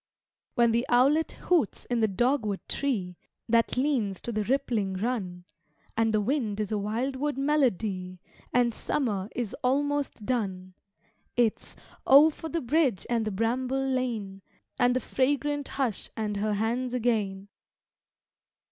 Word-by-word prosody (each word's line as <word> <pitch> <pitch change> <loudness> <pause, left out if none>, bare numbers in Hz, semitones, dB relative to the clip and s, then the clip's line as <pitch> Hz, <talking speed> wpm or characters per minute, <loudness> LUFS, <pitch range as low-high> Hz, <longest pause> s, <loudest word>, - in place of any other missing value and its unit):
When 235 -1 +4
the 235 +1 +2
owlet 275 +6 +3
hoots 335 - 0
in 240 -1 -1
the 220 - +3
dogwood 215 -1 0
tree, 195 -11 -1 0.3
That 230 +1 +2
leans 250 -9 0
to 240 - -4
the 215 -1 -1
rippling 225 -6 0
Run, 185 -5 -3 0.5
And 225 0 +2
the 215 - +2
wind 220 -3 -1
is 210 -1 -2
a 215 - +1
wildwood 260 +7 -2
melody, 215 - 0 0.3
And 240 -1 +3
summer 210 -7 -2
is 235 -4 -3
almost 285 -3 0
done 190 -7 -2 0.6
It's 235 -3 0 0.3
Oh, 290 +4 +8
for 320 +1 -8
the 335 0 -2
bridge 260 - +1
and 230 -2 +1
the 215 - -2
bramble 250 +6 0
lane, 230 -7 -2 0.4
And 245 0 +4
the - - +2
fragrant 285 +3 0
hush 255 -7 -2
and 210 -2 -2
her 210 +1 0
hands 240 +4 -1
again! 205 -5 -1
235 Hz, 140 wpm, -28 LUFS, 210-265 Hz, 0.6 s, Oh